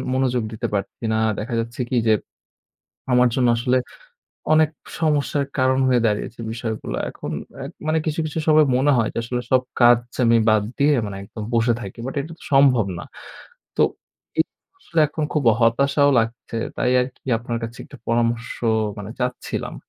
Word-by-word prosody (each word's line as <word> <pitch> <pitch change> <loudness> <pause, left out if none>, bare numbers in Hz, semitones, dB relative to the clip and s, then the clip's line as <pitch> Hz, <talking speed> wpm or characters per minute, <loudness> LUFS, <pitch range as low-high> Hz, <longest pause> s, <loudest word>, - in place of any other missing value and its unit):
মনোযোগ 125 -2 +1
দিতে 110 - -3
পারছি 100 +3 -4
না, - - +1 0.2
দেখা 115 +3 -3
যাচ্ছে 120 +2 -6
কী 125 - +1
যে, - - +6 1.0
আমার 125 0 +5
জন্য 125 -2 +3
আসলে 125 +2 +1 0.8
অনেক 155 -1 +5 0.3
সমস্যার 150 -2 +1
কারণ 130 0 +3
হয়ে 125 -2 +3
দাঁড়িয়েছে 105 +2 -2
বিষয়গুলা 115 -1 -4
এখন - - -7 0.2
অ্যা - - -7 0.2
মানে 155 - +2
কিছু, 160 0 -1
কিছু 155 +1 -3
সময় 155 -1 +6
মনে 140 +3 +3
হয় 115 -2 +1
যে - - -6
আসলে 125 +1 -2
সব 130 - +5 0.2
কাজ 120 0 +8 0.3
আমি 115 0 +5
বাদ 110 -1 +4
দিয়ে 145 +1 +4
মানে 100 -1 -6
একদম 105 +1 -8
বসে 115 +1 +3
থাকি। 100 +1 -8
বাট 135 - -5
এটা 160 +4 -8
তো - - -15
সম্ভব 135 -5 +5
না। - - -6 0.7
তো - - +4 0.6
এই - - +5 0.3
আসলে 170 - -1
এখন 155 0 -3
খুব 150 -4 0 0.2
হতাশাও 140 +5 +3
লাগছে 115 0 -2 0.2
তাই 125 - +1
আরকি 125 +1 -6
আপনার 120 0 -4
কাছে 115 +2 -6
একটা - - -13
পরামর্শ 115 0 +1 0.5
মানে 105 +1 -6
চাচ্ছিলাম। 125 0 -3
125 Hz, 170 wpm, -22 LUFS, 115-140 Hz, 1.0 s, কাজ